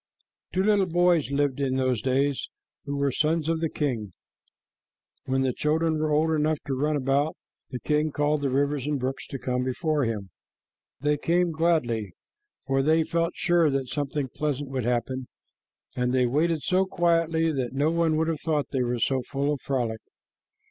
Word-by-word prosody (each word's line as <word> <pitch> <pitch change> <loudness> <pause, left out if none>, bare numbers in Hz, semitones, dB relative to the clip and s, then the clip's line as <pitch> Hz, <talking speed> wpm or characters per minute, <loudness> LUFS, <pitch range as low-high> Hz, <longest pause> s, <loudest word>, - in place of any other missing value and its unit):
Two 185 - +1
little 205 -2 +3
boys 175 -3 +3
lived 140 -1 0
in 135 -2 0
those 130 -4 +1
days 135 +2 0 0.4
who 140 0 -3
were 140 -1 +1
sons 155 +3 +1
of 165 0 +1
the 165 - 0
king. 115 - -2 1.1
When 135 0 +1
the 130 -1 +1
children 155 +2 +1
were 155 0 0
old 155 +2 +2
enough 155 0 +1
to 140 - -2
run 150 +3 0
about, 140 +2 +1 0.3
the 125 - -5
king 150 +2 0
called 145 +1 +1
the 140 - 0
rivers 140 +1 0
and 150 -2 0
brooks 130 +1 -3
to 135 - -5
come 125 -1 -1
before 145 +2 0
him. 105 -4 -4 0.7
They 150 +1 +2
came 175 +2 +2
gladly, 125 - 0 0.5
for 135 -1 +1
they 160 +3 +3
felt 165 +1 -1
sure 170 -3 +3
that 135 -2 -1
something 145 -1 -2
pleasant 145 0 -3
would 130 -4 -2
happen, 125 +1 -1 0.7
and 125 0 0
they 130 -1 +3
waited 155 +5 +1
so 185 +1 +2
quietly 165 -2 +2
that 130 -4 -2
no 145 +4 +2
one 165 -2 +2
would 160 +1 +1
have 160 -2 -2
thought 155 -3 -1
they 130 - 0
were 120 0 0
so 130 +2 +1
full 140 +3 -1
of 145 - -5
frolic. 120 -5 -2
145 Hz, 180 wpm, -26 LUFS, 130-160 Hz, 1.1 s, little